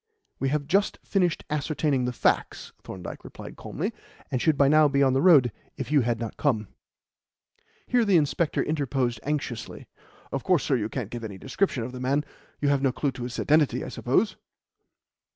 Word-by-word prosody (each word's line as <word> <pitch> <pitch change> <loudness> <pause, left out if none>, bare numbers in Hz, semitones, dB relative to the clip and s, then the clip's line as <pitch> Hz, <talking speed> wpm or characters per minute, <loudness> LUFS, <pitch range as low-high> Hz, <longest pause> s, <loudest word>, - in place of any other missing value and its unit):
"We 135 - 0
have 145 0 -1
just 195 +7 +1
finished 180 -5 0
ascertaining 150 -3 0
the 125 - -1
facts," 120 - 0
Thorndyke 90 -2 -8
replied - - -10
calmly, - - -4 0.4
"and 125 - 0
should 160 -3 +2
by 140 - +5
now 155 +1 +6
be 140 0 +2
on 135 -1 +3
the 135 - +2
road 145 -10 +6 0.3
if - - -5
you 145 -2 +5
had 120 -1 0
not 115 -2 -5
come." 110 -9 0 1.2
Here 245 -1 +2
the 200 -5 +4
inspector 155 +1 +1
interposed 135 -6 -1
anxiously. 135 -6 -4 0.5
"Of 135 - -3
course, 180 -6 +2
sir, 135 - +1
you 110 -3 -1
can't 115 -5 -4
give 120 -1 -6
any 100 -3 -6
description 135 - -1
of 120 - -5
the 125 - -8
man. 140 +4 0 0.3
You 145 - +1
have 140 -1 +2
no 135 -2 +2
clue 140 +2 -1
to 125 - -9
his 120 -1 -5
identity, 150 -1 +2
I - - -5
suppose?" - - 0
140 Hz, 190 wpm, -26 LUFS, 125-150 Hz, 1.2 s, now